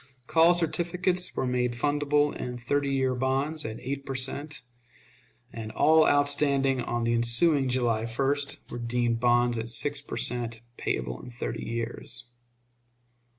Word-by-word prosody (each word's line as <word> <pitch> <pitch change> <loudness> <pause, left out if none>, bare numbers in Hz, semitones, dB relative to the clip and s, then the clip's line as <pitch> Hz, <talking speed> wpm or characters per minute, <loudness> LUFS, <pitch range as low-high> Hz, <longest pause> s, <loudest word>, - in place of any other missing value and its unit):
Call 165 +4 +5
certificates 175 +2 0
were - - -1
made 125 -1 0
fundable 145 +3 +1
in 125 0 -5
thirty 140 +4 0
years 130 -2 0
bonds 135 +4 0
at 110 +1 -5
eight 140 +2 -4
per 135 -1 -5
cent., 140 +2 -3 0.9
and 110 -1 -6
all 160 0 +5
outstanding 140 -2 +2
on 120 0 -2
the 115 0 +1
ensuing 130 +5 +2
July 120 -3 0
1st 140 +4 -1
were 120 - -5
deemed 120 0 0
bonds 120 -1 +3
at 115 +1 -4
six 140 +5 -2
per - - -6
cent., 115 -2 -1
payable 60 - -3
in - - -10
thirty 120 +1 -5
years. 115 +1 -2
130 Hz, 145 wpm, -27 LUFS, 120-145 Hz, 0.9 s, Call